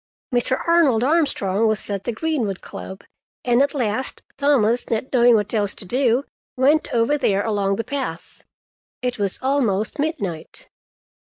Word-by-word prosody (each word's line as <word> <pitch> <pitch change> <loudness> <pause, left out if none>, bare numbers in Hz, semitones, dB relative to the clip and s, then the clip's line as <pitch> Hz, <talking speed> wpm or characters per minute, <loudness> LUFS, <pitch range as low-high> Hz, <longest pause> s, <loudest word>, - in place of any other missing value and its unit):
Mr. 245 +2 +1
Arnold 305 -9 +4
Armstrong 230 - +1
was 215 -2 -1
at 200 -2 -4
the - - -1
Greenwood 235 - -2
Club, 190 +1 -9 0.4
and 245 +1 +3
at 285 +1 +1
last 240 -1 -2
Thomas, 255 -5 +2
not 230 +4 -2
knowing 240 -1 +6
what 210 0 0
else 205 -3 0
to - - -3
do, 250 +4 +1 0.3
went 290 +5 +3
over 240 +5 +1
there 200 -6 +1
along 200 -3 0
the 230 - -3
path. 280 0 -6 0.6
It 250 -2 -2
was 200 -2 +1
almost 245 -4 0
midnight. 200 - -4
240 Hz, 150 wpm, -21 LUFS, 205-275 Hz, 0.6 s, knowing